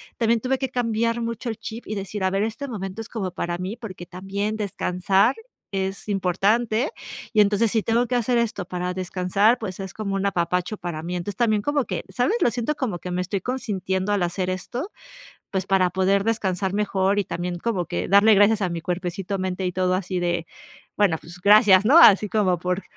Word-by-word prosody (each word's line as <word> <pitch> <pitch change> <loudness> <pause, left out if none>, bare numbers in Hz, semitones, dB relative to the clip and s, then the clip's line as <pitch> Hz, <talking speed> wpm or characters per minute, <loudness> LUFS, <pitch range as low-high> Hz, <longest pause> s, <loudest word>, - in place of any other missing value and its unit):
también 230 0 +2
tuve 260 +3 0
que 265 0 -3
cambiar 230 -1 0
mucho 230 +1 -4
el 225 - -4
chip 230 +2 -8
y 215 - -5
decir: 195 0 -4
"A 190 - +3
ver, 195 +2 0
este 225 +6 -4
momento 195 -2 -5
es 225 - -9
como 195 -5 -3
para 175 0 -3
mí", 185 +4 -4
porque 200 -7 -9
también 195 +4 -4
descansar 200 +1 +1 0.4
es 195 +1 -3
importante. 215 - +1 0.4
Y 215 - +5
entonces 210 +2 +3
si 220 -2 +1
tengo 235 +2 +1
que 250 - -1
hacer 240 0 +2
esto 220 -5 -2
para 180 0 -3
descansar, 190 +5 +1
pues, 190 -4 -6
es 190 -1 -6
como 200 -2 -3
un 195 0 -1
apapacho 180 +1 -1
para 175 -4 -5
mí. 175 +2 -4
Entonces 180 +3 -4
también 215 -4 +2
como 290 +1 0
que, - - -4
¿sabes? 265 - +1
Lo - - +4
siento 245 +5 -1
como 240 -11 -2
que 180 - -6
me 180 +1 -1
estoy 190 +1 -3
consintiendo 200 -5 -2
al 200 -3 +1
hacer 180 +1 -2
esto, 245 - -4 0.6
pues, 190 -1 -1
para 190 -2 +3
poder 190 +2 +1
descansar 190 -4 -1
mejor, 200 -1 +1
y 205 - +1
también 175 +1 -4
como 180 -3 -2
que 85 - -3
darle 205 +2 +6
gracias 205 +1 +4
a 185 - +1
mi 170 -1 -4
cuerpecito 180 +2 -3
mente 185 0 -2
y 180 - 0
todo 185 0 +1
así 185 -1 -2
de; 175 -1 -1 0.5
"Bueno, 195 -6 +2
pues 175 +2 -13
gracias", 205 -1 +6
¿no? 285 +8 +6
Así 210 - +7
como 185 -5 +1
por 180 +2 -2
195 Hz, 205 wpm, -23 LUFS, 180-225 Hz, 0.6 s, Así